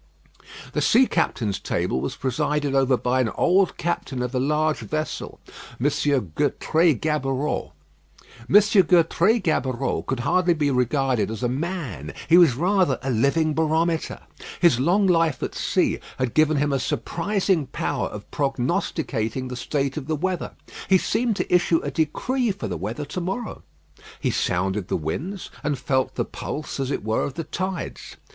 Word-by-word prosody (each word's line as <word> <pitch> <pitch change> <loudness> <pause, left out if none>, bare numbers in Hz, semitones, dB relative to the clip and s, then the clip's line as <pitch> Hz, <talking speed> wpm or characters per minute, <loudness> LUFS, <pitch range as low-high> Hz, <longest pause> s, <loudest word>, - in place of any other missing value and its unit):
The - - 0
sea 250 +3 +5
captains' 105 - -1
table 65 - -1
was - - -3
presided 145 +2 -1
over 135 -2 +3
by 125 +2 +1
an 120 - +1
old 185 +1 +3
captain 145 -6 -2
of 125 +1 -4
a 130 - +1
large 150 +3 +1
vessel, 155 0 -4 0.4
M. 125 - -2 0.5
Gertrais 155 - +2
Gaboureau. 140 +1 -1 0.8
M. - - +2 0.3
Gertrais 175 +5 +4
Gaboureau 135 -5 0
could 130 -2 -2
hardly 175 +6 +2
be 145 -2 +1
regarded 125 -2 +1
as 110 0 -5
a - - +3
man; 130 - -4
he 165 - +6
was 160 -9 +6
rather 180 -2 +2
a 135 - -1
living 140 +7 +2
barometer. 160 +1 0 0.4
His 170 -9 +4
long 180 +9 +3
life 165 -6 +2
at - - -3
sea - - 0 0.2
had 130 -3 -1
given 155 -1 +3
him 145 0 +1
a 135 - +1
surprising 185 +1 -1
power - - -2
of - - -8
prognosticating 130 -3 -1
the 125 - -5
state 135 +2 -2
of 140 -3 -5
the 160 - 0
weather. 180 +3 -2 0.4
He 190 - +7
seemed 220 +4 0
to - - -2
issue 175 -1 +3
a 145 - -3
decree 230 - 0
for 190 - -3
the 90 - -3
weather 110 - -4
to 150 +5 -5
morrow. 195 +6 -4 0.6
He - - 0
sounded 95 +2 -1
the - - 0
winds, 165 - -4
and 145 -1 0
felt 130 0 0
the - - -1
pulse, 150 -1 -6
as 135 -1 -1
it 140 - -2
were, 110 +1 0
of 135 - -3
the 165 - -3
tides. 185 +2 -5
150 Hz, 165 wpm, -24 LUFS, 130-170 Hz, 0.8 s, He